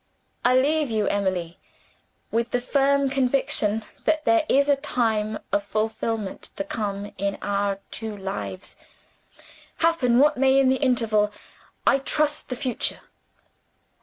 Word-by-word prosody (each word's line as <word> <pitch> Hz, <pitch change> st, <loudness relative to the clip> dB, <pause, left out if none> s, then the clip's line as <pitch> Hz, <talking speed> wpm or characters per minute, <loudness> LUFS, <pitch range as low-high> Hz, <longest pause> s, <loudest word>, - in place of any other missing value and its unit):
I 250 Hz, +1 st, +4 dB
leave 295 Hz, +2 st, +2 dB
you, 220 Hz, -2 st, 0 dB
Emily 185 Hz, -4 st, -1 dB, 0.7 s
with 230 Hz, +1 st, 0 dB
the 245 Hz, -, 0 dB
firm 275 Hz, +2 st, +2 dB
conviction 260 Hz, -5 st, +1 dB, 0.2 s
that 315 Hz, -1 st, +1 dB
there 335 Hz, -2 st, +3 dB
is 280 Hz, +1 st, +4 dB
a 285 Hz, -, +5 dB
time 225 Hz, -6 st, -1 dB
of 200 Hz, +1 st, +2 dB
fulfillment 215 Hz, 0 st, -3 dB
to -, -, -2 dB
come 200 Hz, 0 st, -4 dB
in 200 Hz, 0 st, -1 dB
our 200 Hz, -1 st, 0 dB
two 220 Hz, -2 st, -5 dB
lives. 195 Hz, -1 st, -5 dB, 1.0 s
Happen 320 Hz, -8 st, +2 dB
what 295 Hz, +2 st, +4 dB
may 265 Hz, +1 st, +4 dB
in 270 Hz, -1 st, +4 dB
the 260 Hz, -, +3 dB
interval 225 Hz, -6 st, +2 dB, 0.5 s
I 275 Hz, -, +4 dB
trust 300 Hz, +2 st, 0 dB
the 250 Hz, -, -2 dB
future." 250 Hz, -1 st, -2 dB
235 Hz, 135 wpm, -24 LUFS, 205-275 Hz, 1.0 s, a